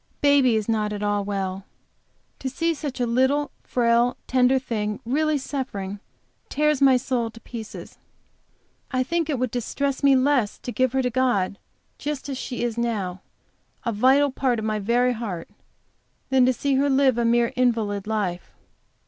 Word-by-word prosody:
Baby 280 -4 +4
is 215 -2 -1
not 215 -2 0
at 210 0 -4
all 205 -1 0
well. 195 -1 -3 0.8
To 265 - -3
see 330 +5 -1 0.2
a 245 - +2
little 265 +5 +1
frail, 235 0 +2
tender 255 +1 +3
thing 210 -5 -3
really 305 +5 +1
suffering, 210 -8 -4 0.5
tears 300 -1 +1
my 265 -2 +6
soul 245 -2 -1
to 230 - -13
pieces. 225 -2 -9 0.9
I 255 -1 0
think 330 +3 -1
it 285 - 0
would 250 -1 -1
distress 265 +3 -2
me 280 -1 +5
less 260 -5 +2
to 245 - -6
give 255 0 +1
her 265 0 +1
to 250 - 0
God 230 -7 +1 0.4
just 290 -1 -4
as 270 - -3
she 245 -2 -4
is 235 -1 -2
now, 200 -6 -2 0.6
a 235 - +1
vital 265 +6 +4
part 255 -2 0
of 220 - -3
my 215 -1 -1
very 240 +4 +2
heart, 205 -8 -5 0.8
than 260 -1 +4
to - - +5
see 275 +2 0
her 285 +1 +2
live 265 -3 +3
a - - +2
mere 235 +1 +2
invalid 225 -5 0
life. 200 -5 -3
245 Hz, 165 wpm, -24 LUFS, 220-265 Hz, 0.9 s, my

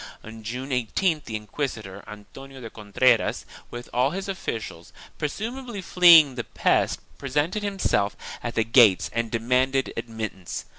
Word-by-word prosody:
On 110 0 -10
June 125 +5 -5
18th 145 - 0
the 110 - -5
inquisitor, 105 -3 -5
Antonio 130 +6 -11
de 115 -3 -9
Contreras, 115 +3 +1 0.2
with 120 0 -8
all 125 +2 +2
his 190 +5 -5
officials, 115 - -5 0.3
presumably 230 - -4
fleeing 170 -4 +7
from 130 - -13
the 120 - -2
pest, - - +1 0.2
presented 150 +9 -1
himself 195 - 0 0.2
at 120 - -5
the 110 - +2
gates 110 -6 +5
and 115 0 -1
demanded 125 +4 0
admittance. 110 -5 -6
125 Hz, 140 wpm, -25 LUFS, 110-150 Hz, 0.3 s, fleeing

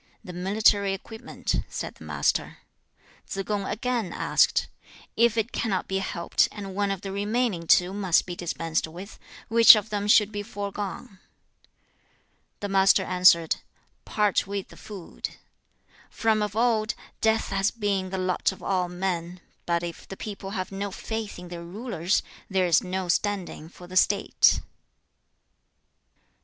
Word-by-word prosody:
'The 180 - -9
military 200 +2 +2
equipment,' 220 +3 -5
said - - -5
the - - -15
Master. - - -1 0.7
3. 195 - -3
Tsze - - -22
kung 205 -2 -2
again 235 -4 -2
asked, - - +2 0.5
'If 235 0 +3
it 225 +2 0
cannot 200 -5 -1
be 190 0 -1
helped, 170 -3 +1
and 200 -2 -7
one 200 +1 0
of 195 -2 -3
the 195 - -5
remaining 205 -3 -1
two 180 +3 +4
must 190 -4 +2
be 175 - -6
dispensed 165 -2 -2
with, 180 +6 -10 0.3
which 230 0 +9
of 215 0 -3
them 205 -1 -1
should 210 0 +5
be 205 -1 -3
foregone?' 200 -2 -6 1.4
The 205 - -2
Master 195 0 +4
answered, 180 -3 +4 0.5
'Part 210 -3 +1
with 200 -1 -4
the - - -14
food. 195 -5 -8 0.7
From 220 -1 +1
of 210 -1 -2
old, 225 -2 +1 0.3
death 220 0 +2
has 195 +1 +1
been 200 -4 -1
the 190 - -3
lot 185 0 0
of 190 - -12
all 180 -2 0
men; 180 -1 -3 0.3
but 170 0 +1
if 170 -1 -7
the 195 - -8
people 200 -2 -6
have 185 +1 -4
no 200 +1 -3
faith 220 +2 -5
in 180 0 -10
their 175 -1 -7
rulers, 190 -1 -1 0.3
there 190 -2 +2
is 170 -3 +4
no 185 0 -3
standing 185 -4 -1
for 180 - -13
the 180 +1 -10
state.' 195 +2 +4
195 Hz, 150 wpm, -26 LUFS, 180-210 Hz, 1.4 s, which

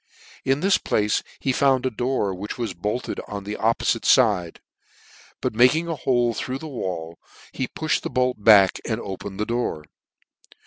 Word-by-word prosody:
In 135 +2 +1
this 195 +1 +3
place 105 0 0 0.2
he 135 - 0
found 130 -1 +2
a 130 - 0
door 120 -4 -1
which 95 +3 -6
was 115 -6 -3
bolted 105 +8 -3
on 100 -1 -6
the 105 +1 -5
oppofite 115 +1 +1
fide: 100 -9 +3 0.8
but - - -1
making 130 +9 +4
a 165 - -2
hole 120 -3 +1
through 130 +3 -4
the 160 - -8
wall, 85 - -5 0.3
he 130 - -3
puftied 155 -1 -1
the - - -4
bolt 125 -4 0
back, 100 -4 +6
and: 110 -1 -2
opened 95 -1 -7
the 105 - 0
door. 115 -10 -2
115 Hz, 170 wpm, -23 LUFS, 100-130 Hz, 0.8 s, back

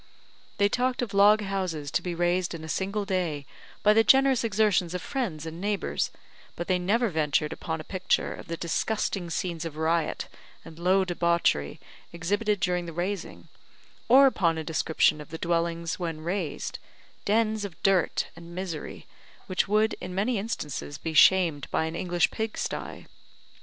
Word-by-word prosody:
They 200 - +4
talked 250 +3 0
of 220 - -5
log 205 +2 +6
houses 185 -8 -3
to - - +1
be 175 -2 -4
raised 175 +1 0
in 160 - -8
a - - -7
single 200 +5 -2
day, 175 -7 -1 0.4
by 210 - +6
the 225 +1 +5
generous 270 0 +5
exertions 205 -5 +2
of 180 - -3
friends 195 - -3
and 165 +2 -7
neighbours, 205 0 -1 0.5
but 175 - -5
they 185 -1 +2
never 220 +6 +1
ventured 150 -2 0
upon 160 0 -4
a - - -6
picture 185 +3 0
of - - -10
the 165 - -4
disgusting 180 +1 -1
scenes 170 0 -3
of 160 -2 -6
riot 160 0 0 0.4
and 160 0 -12
low 185 +2 +3
debauchery 170 - +1 0.3
exhibited 205 +5 0
during 180 0 0
the 165 - -6
raising, 180 +3 -4 0.6
or 270 +3 +8
upon 170 -11 +2
a 160 - -3
description 155 -1 +1
of 150 - -11
the 160 - -6
dwellings 170 0 -1
when 165 -3 -3
raised 170 -2 -3 0.4
dens 215 0 +1
of 195 -5 -6
dirt 190 -3 +2
and 170 +1 -11
misery, 180 -4 -5 0.4
which 185 - 0
would, 215 +2 +2
in 180 0 -6
many 210 +3 +1
instances, 150 -9 -4
be 160 - -4
shamed 165 -4 +5
by 160 - 0
an 160 +1 -4
English 175 -1 +1
pig 220 -1 -3
sty. - - -4
180 Hz, 170 wpm, -27 LUFS, 165-205 Hz, 0.6 s, or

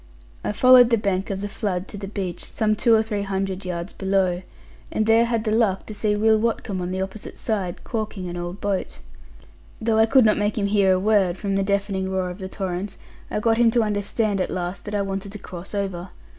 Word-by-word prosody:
I - - -1
followed 250 +2 +7
the 230 - +4
bank 195 -3 -1
of 195 -1 -3
the 205 - -2
flood 195 -3 -3
to - - -8
the 195 - -5
beach, 190 -3 -4
some 215 -1 0
two 230 +1 +4
or 220 - +3
three 210 -2 -2
hundred 195 -1 -3
yards 175 +1 -4
below; 190 -2 +1 0.5
and 215 - 0
there 225 +1 +5
had 230 -2 0
the 215 - -1
luck 215 -4 +2
to 215 - -7
see 210 0 0
Will 220 +1 +4
Watcombe 215 -4 -1
on 180 - -3
the 190 +1 -1
opposite 195 +2 -8
side, 195 -6 -3
caulking 215 -5 -4
an 175 - -5
old 175 +2 -5
boat. 200 -2 -2 0.8
Though 220 0 +1
I 220 - +5
could 260 0 +5
not 210 -1 +3
make 205 +1 0
him 205 - +1
hear 200 -1 +3
a 185 - +2
word, 195 -3 +2
from 200 0 -2
the 195 - +2
deafening 195 -1 -1
roar 185 -1 -1
of 180 - -10
the 190 -1 -6
torrent, 190 0 -4 0.3
I - - -1
got 225 +1 +2
him 235 -1 +6
to 230 0 +2
understand 205 -1 0
at - - -1
last 180 +1 -4
that 210 0 -4
I 200 - +1
wanted 195 0 -4
to - - -5
cross 180 0 -8
over. 190 -3 -3
200 Hz, 230 wpm, -23 LUFS, 190-215 Hz, 0.8 s, followed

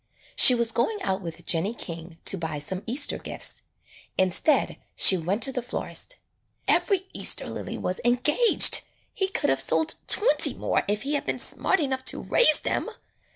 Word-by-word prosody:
She 250 - +7
was 235 -1 0
going 415 - -2
out 190 0 -2
with 170 -1 -9
Jennie 185 +7 -1
King 165 -4 -8
to - - +2
buy 160 -4 -5
some 180 +6 -2
Easter 270 +6 +2
gifts. - - -3 0.6
Instead 190 - +2 0.2
she 190 - +7
went 185 +6 -2
to 270 - 0
the 250 - -4
florist. 250 - -4 0.5
''Every 385 -3 +1
Easter - - -1
lily - - -7
was 180 - -4
engaged; 255 - +5 0.3
he 385 - -2
could 395 - -1
have - - 0
sold 320 0 0
twenty 465 +4 +2
more - - -1
if 210 +1 -2
he 285 +2 -3
had 290 - -3
been - - -2
smart 385 - -2
enough 265 -4 -3
to - - 0
raise 310 -11 +2
them." - - -3
235 Hz, 170 wpm, -24 LUFS, 185-300 Hz, 0.6 s, She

